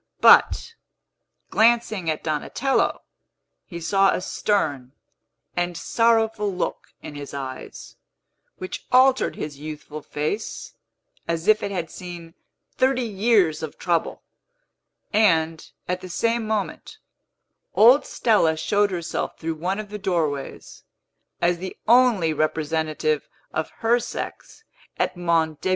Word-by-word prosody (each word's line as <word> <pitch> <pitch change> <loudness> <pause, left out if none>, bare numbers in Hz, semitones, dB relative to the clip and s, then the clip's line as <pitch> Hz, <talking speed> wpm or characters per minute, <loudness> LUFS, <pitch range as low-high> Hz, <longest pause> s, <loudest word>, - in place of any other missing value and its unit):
But, - - +5 0.8
glancing 220 -6 +2
at 155 - -2
Donatello, 165 - 0 0.6
he 170 -3 -7
saw 195 +4 +3
a - - +1
stern 145 -10 -1 0.6
and 175 -1 -1
sorrowful 225 -2 +1
look 180 - -3 0.2
in - - -8
his 145 -1 -8
eyes, 130 -2 -8 0.6
which 185 - -7
altered 260 +1 +4
his 145 -2 -6
youthful 155 0 -7
face 155 +10 -4 0.5
as 170 +2 -2
if 215 0 +5
it - - -2
had 175 -4 -4
seen 175 -2 -9 0.4
thirty 260 -1 +2
years 200 -7 +2
of 160 -2 -6
trouble; 170 -2 -1 0.9
and, 165 -7 +2 0.2
at 180 0 -2
the 185 - -9
same 230 +5 0
moment, 215 -2 -3 0.8
old 245 +6 +7
Stella 170 -9 +2
showed 205 +5 +2
herself 170 -3 -3
through 165 0 -3
one 180 +5 -2
of 210 -1 -6
the 210 - -5
doorways, 160 -8 -3 0.6
as 175 0 +2
the 185 +1 -7
only 230 -9 +4
representative 155 0 -1 0.2
of 155 - -2
her 235 +2 +3
sex 445 - -7 0.3
at - - 0
Monte 165 -3 0
Beni. - - -1
180 Hz, 120 wpm, -23 LUFS, 160-215 Hz, 0.9 s, old